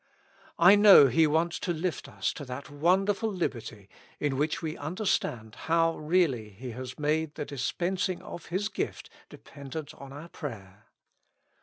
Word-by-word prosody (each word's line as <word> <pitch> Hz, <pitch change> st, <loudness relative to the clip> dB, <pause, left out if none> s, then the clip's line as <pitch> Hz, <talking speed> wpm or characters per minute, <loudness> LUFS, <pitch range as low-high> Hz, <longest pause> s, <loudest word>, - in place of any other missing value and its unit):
I 180 Hz, +4 st, +8 dB
know 205 Hz, -7 st, +9 dB
He 155 Hz, +6 st, +4 dB
wants 165 Hz, +3 st, 0 dB
to 175 Hz, -, -2 dB
lift 170 Hz, +1 st, -3 dB
us -, -, -2 dB
to 145 Hz, -, -8 dB
that 130 Hz, +3 st, -7 dB
wonderful 195 Hz, +8 st, +1 dB
liberty, 115 Hz, -, -4 dB, 0.3 s
in 145 Hz, -2 st, 0 dB
which 150 Hz, +3 st, 0 dB
we 160 Hz, -1 st, -4 dB
under 175 Hz, +9 st, -5 dB
stand 110 Hz, -, -1 dB, 0.2 s
how 165 Hz, 0 st, +3 dB
really 150 Hz, -9 st, +1 dB
He 120 Hz, +5 st, -8 dB
has 125 Hz, +2 st, -7 dB
made 155 Hz, +1 st, -1 dB
the -, -, -4 dB
dispensing 180 Hz, +7 st, -2 dB
of 175 Hz, -, -9 dB
His 190 Hz, +4 st, -1 dB
gift -, -, -5 dB, 0.2 s
dependent 145 Hz, +2 st, -9 dB
on 140 Hz, -3 st, -11 dB
our 150 Hz, +5 st, -9 dB
prayer. 105 Hz, -, -9 dB
155 Hz, 155 wpm, -28 LUFS, 130-175 Hz, 0.3 s, know